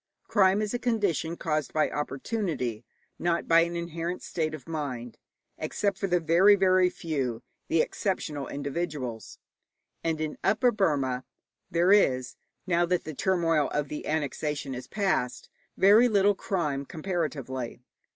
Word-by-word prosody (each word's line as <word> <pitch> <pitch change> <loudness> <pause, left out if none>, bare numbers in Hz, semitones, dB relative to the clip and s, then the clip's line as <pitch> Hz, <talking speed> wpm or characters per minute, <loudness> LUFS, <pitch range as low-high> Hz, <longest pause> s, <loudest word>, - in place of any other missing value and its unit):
Crime 195 0 +4
is 210 - -3
a 245 - -1
condition 200 - 0
caused 155 -4 -2
by 155 - +3
opportunity, 145 - -3 0.4
not 170 -1 0
by 165 0 +6
an 170 +1 +1
inherent 170 +1 -4
state 155 -2 -2
of 155 - -13
mind, 130 -7 -5 0.4
except 200 -2 -1
with 195 - 0
the 180 0 +3
very, 175 +5 +5
very 185 -1 +4
few, 135 -10 -3 0.2
the 165 - +3
exceptional 150 -8 -2
individuals; 140 -5 -4 0.7
and 160 -1 0
in 155 -1 -3
Upper 240 +5 +3
Burma 140 - 0 0.5
there 175 +3 +3
is, 130 -11 +3 0.3
now 175 -2 +2
that 180 0 +1
the 155 - -6
turmoil 165 -2 +1
of 145 -1 -2
the 150 - -5
annexation 150 -2 -2
is 125 0 -7
past, 190 - -1 0.3
very 210 +6 +7
little 205 -2 +4
crime 150 -8 -2
comparatively. 150 -8 -4
165 Hz, 140 wpm, -28 LUFS, 140-190 Hz, 0.7 s, very